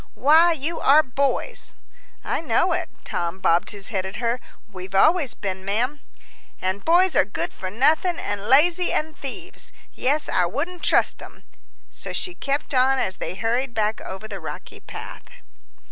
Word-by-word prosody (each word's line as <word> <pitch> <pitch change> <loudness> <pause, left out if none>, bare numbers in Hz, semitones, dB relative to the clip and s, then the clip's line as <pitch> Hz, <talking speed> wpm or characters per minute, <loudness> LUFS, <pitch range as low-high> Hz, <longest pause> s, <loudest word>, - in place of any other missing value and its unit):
Why, 320 +6 +5
you 320 +2 -3
are 295 +3 +6
boys!" 280 - -2 0.5
"I - - -2
know 330 +5 +2
it." 345 -1 -2
Tom 170 +1 -3
bobbed 170 -2 +2
his 200 -2 -5
head 195 -4 -1
at 190 0 -6
her. 235 +1 -1 0.3
"We've 190 -2 -9
always 295 - +3
been, 190 -1 -5
ma'am." 245 +9 -1 0.6
"An' 185 +1 -2
boys 350 - +3
are - - +6
good 205 - -3
for 185 - -6
nothing, 310 - +2
an' 205 0 -3
lazy, 340 +6 +5
an' 315 +1 -1
thieves 345 +7 -7 0.2
yes, 290 +4 0
I 180 -2 +2
wouldn't 335 - -4
trust - - +2
'em." - - -13 0.5
So - - -7
she 360 - -2
kept 280 -2 -2
on 265 +1 +4
as 190 -7 -1
they - - -5
hurried 235 +4 -1
back 215 0 0
over 190 +3 -7
the - - -6
rocky - - -8
path. - - -9
260 Hz, 165 wpm, -23 LUFS, 200-315 Hz, 0.6 s, are